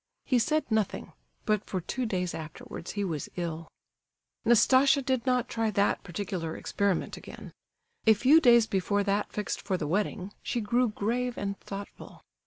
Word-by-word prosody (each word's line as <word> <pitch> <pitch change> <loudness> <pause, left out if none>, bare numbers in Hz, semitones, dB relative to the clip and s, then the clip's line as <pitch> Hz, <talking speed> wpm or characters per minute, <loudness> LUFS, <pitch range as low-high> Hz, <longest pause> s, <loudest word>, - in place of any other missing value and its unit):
He 255 -2 +3
said 305 +6 +1
nothing, 220 -3 -1 0.3
but 215 -2 +1
for 185 - -3
two 245 +8 -3
days 180 -4 -2
afterwards 160 +1 -7
he 205 - -2
was 160 -6 -3
ill. 165 -2 -4 0.8
Nastasia 265 +4 +5
did 260 -1 -1
not 250 -2 +2
try 225 -1 -1
that 200 -1 +1
particular 175 -3 -4
experiment 200 -4 -1
again. - - -11 0.5
A 220 - +8
few 275 +9 +5
days 235 -5 +6
before 200 0 0
that 200 +1 0
fixed 210 -1 -3
for 190 -2 -1
the 160 - -3
wedding, 200 +3 -2
she 245 - -2
grew 235 +3 +1
grave 240 +4 -2
and 200 0 -2
thoughtful. 200 0 -9
210 Hz, 160 wpm, -29 LUFS, 190-240 Hz, 0.8 s, A